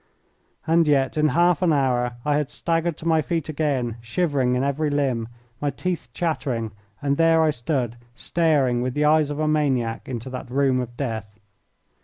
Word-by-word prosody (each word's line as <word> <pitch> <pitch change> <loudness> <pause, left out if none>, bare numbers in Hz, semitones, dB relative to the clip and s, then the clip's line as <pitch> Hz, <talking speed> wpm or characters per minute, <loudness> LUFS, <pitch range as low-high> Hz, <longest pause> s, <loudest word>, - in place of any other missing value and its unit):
And 165 0 +3
yet 135 -3 +2
in 155 0 +3
half 175 +1 +3
an 180 -3 +3
hour 125 -4 +1
I 145 -1 +2
had 150 -2 -1
staggered 165 +1 -1
to 165 - -6
my 160 -1 +4
feet 165 -1 -2
again, 140 -7 -1
shivering 130 0 0
in 125 - 0
every 145 +2 0
limb, 135 -6 0 0.3
my 145 - +1
teeth 160 -1 -3
chattering, 130 -8 -2 0.3
and 140 0 +1
there 165 -1 +4
I 155 - +3
stood 120 -3 -2 0.2
staring 145 -8 +1
with 125 0 -2
the 150 0 +2
eyes 155 -1 +4
of 145 - -4
a 155 0 0
maniac 130 -8 0
into 125 0 -5
that 130 -1 -6
room 135 0 +2
of 120 -1 -5
death. 110 -6 -4
140 Hz, 180 wpm, -23 LUFS, 125-155 Hz, 0.3 s, my